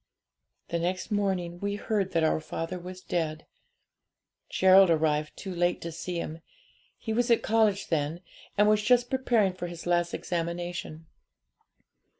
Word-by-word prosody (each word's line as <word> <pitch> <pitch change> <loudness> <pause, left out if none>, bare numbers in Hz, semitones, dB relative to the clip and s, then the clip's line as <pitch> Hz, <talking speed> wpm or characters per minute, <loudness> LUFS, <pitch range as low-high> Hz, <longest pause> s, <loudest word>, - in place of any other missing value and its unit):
'The 170 - -1
next 185 +5 -2
morning 185 -4 -1
we 200 +1 -2
heard 205 -2 -1
that 165 - +1
our 155 - +2
father 165 +3 -5
was 185 +1 -9
dead. 155 -3 -2 1.0
Gerald 190 0 +6
arrived 155 -2 +1
too 190 -2 -6
late 175 0 +1
to 170 - -5
see 175 +2 -5
him; 160 0 -6 0.6
he 220 - -4
was 240 +2 +1
at 235 - +4
college 215 -3 +2
then, 160 +1 -1 0.4
and 210 +1 +5
was 215 0 +4
just 245 +2 +3
preparing 235 -7 +2
for 175 -1 -5
his 170 -1 -8
last 175 -1 +1
examination. 170 -2 -4
180 Hz, 150 wpm, -28 LUFS, 170-205 Hz, 1.0 s, Gerald